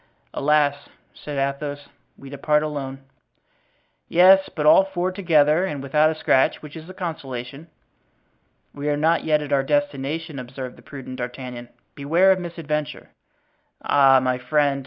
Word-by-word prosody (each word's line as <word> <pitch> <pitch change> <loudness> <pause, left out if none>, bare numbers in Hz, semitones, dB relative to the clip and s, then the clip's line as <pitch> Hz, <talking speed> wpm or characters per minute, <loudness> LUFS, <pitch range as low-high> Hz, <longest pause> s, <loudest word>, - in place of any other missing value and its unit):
"Alas," 145 -1 +1 0.2
said 145 -1 -8
Athos, 145 +1 -3 0.3
"we 135 - -13
depart 150 +2 0
alone." 135 -3 -5 1.0
"Yes; 190 +2 +5
but 150 - -2
all 170 +5 +7
four 185 -1 -3
together 165 -4 +2
and 145 -8 -4
without 150 +3 +3
a 160 - -3
scratch; 135 -3 +1
which 150 -1 -11
is 160 +2 -10
a - - -9
consolation." 140 -5 -6 1.1
"We 145 +1 -4
are 145 - 0
not 160 +3 +2
yet 150 -1 +2
at 145 -1 -4
our 140 - +3
destination," 145 +2 -2
observed 125 0 -8
the - - -17
prudent 130 -2 -9
D'Artagnan; 125 -1 -7 0.2
"beware 165 +7 +3
of 190 - +2
misadventure." 155 -4 -5 0.7
"Ah, 135 -2 +5
my 130 -1 -1
friend!" 140 +2 +1
145 Hz, 145 wpm, -22 LUFS, 135-160 Hz, 1.1 s, all